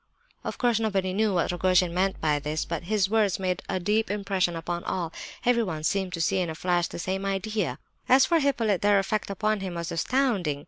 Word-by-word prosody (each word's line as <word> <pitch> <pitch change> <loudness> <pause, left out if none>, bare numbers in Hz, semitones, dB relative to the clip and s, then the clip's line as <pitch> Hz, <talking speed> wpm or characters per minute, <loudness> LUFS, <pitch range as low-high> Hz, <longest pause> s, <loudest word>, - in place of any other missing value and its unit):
Of - - -5
course 240 -3 +2
nobody 195 -4 0
knew 215 +2 +2
what 175 - +1
Rogojin 180 -1 +2
meant 190 +2 0
by 150 -2 +1
this; 150 +1 -2
but 170 0 -4
his 205 0 +1
words 210 -2 +2
made 185 -1 -1
a 185 - 0
deep 210 +5 +1
impression 195 -4 0
upon 170 +1 -4
all. 170 -3 -3 0.3
Everyone 225 -11 +1
seemed 190 +2 0
to 165 - -2
see 190 +3 +1
in 175 -2 -1
a 160 - -5
flash 175 0 +1
the - - -8
same 190 +3 -2
idea. 195 - -1 0.3
As 260 +1 +7
for 335 -1 +3
Hippolyte, 235 - +1
their 205 0 +4
effect 200 +2 -1
upon 215 +2 0
him 185 -2 -5
was 170 0 -4
astounding. 195 - 0
190 Hz, 210 wpm, -26 LUFS, 175-215 Hz, 0.3 s, As